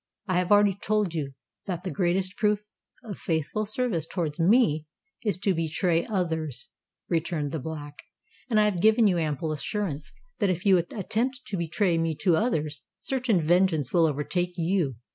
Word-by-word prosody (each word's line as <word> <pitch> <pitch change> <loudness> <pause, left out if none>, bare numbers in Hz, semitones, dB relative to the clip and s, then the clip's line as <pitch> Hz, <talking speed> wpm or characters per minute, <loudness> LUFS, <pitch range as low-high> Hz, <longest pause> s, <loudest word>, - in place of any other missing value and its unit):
"I 185 -2 +2
have 180 +1 -1
already 205 -1 +6
told 205 -2 0
you 145 -4 -3 0.3
that 180 -2 -3
the 185 - -3
greatest 185 +3 0
proof 210 -1 +1 0.4
of 210 -4 -7
faithful 165 +6 -1
service 215 - -1
towards 165 -5 -3
me 165 - +3 0.4
is 205 -5 0
to 195 0 +1
betray 165 +1 +1
others," 160 - -2 0.4
returned 160 -3 -1
the 160 - -3
Black; 145 0 -7 0.5
"and 220 -3 +3
I 210 - +5
have 195 -5 0
given 220 +2 +5
you 180 -4 +3
ample 155 0 -1
assurance 155 -1 -3 0.3
that 205 -4 +2
if 180 +1 -2
you 190 -2 +6
attempt 225 +9 -2
to 210 - -4
betray 170 0 +1
me 165 -1 0
to 180 -4 +4
others, 155 - -1 0.2
certain 245 -8 0
vengeance 165 -4 +2
will 170 -2 +5
overtake 175 +5 -1
you." 170 -5 0
175 Hz, 165 wpm, -27 LUFS, 160-205 Hz, 0.5 s, already